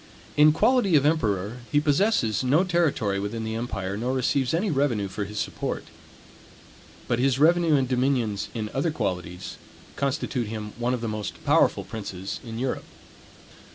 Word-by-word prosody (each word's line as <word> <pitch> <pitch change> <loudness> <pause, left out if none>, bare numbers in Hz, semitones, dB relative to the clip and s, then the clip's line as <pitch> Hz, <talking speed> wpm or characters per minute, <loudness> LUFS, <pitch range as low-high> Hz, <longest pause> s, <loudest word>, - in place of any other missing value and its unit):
In 150 +1 +7
quality 200 +2 +3
of 145 -1 +4
emperor, 110 - +1
he 145 - +4
possesses 145 - +2
no 145 +8 +4
territory 155 - +1
within 105 +3 -3
the 110 0 -3
empire, 105 -5 -3
nor 120 +5 -1
receives 130 0 +1
any 180 +4 0
revenue 135 -8 +1
for 100 +2 -4
his 105 +1 -8
support. - - -3 1.2
But 120 -1 0
his 130 0 +2
revenue 165 +1 +4
and 135 -2 +2
dominions, 125 -5 0
in 110 -2 -3
other 140 +5 +1
qualities, 90 - -4 0.4
constitute 130 -3 -1
him 105 -1 -6
one 125 +1 +1
of 120 - -6
the 115 - -2
most 105 -1 -5
powerful - - +3
princes 100 -3 -6
in 115 -2 -7
Europe. 130 +2 -2
125 Hz, 155 wpm, -25 LUFS, 105-145 Hz, 1.2 s, In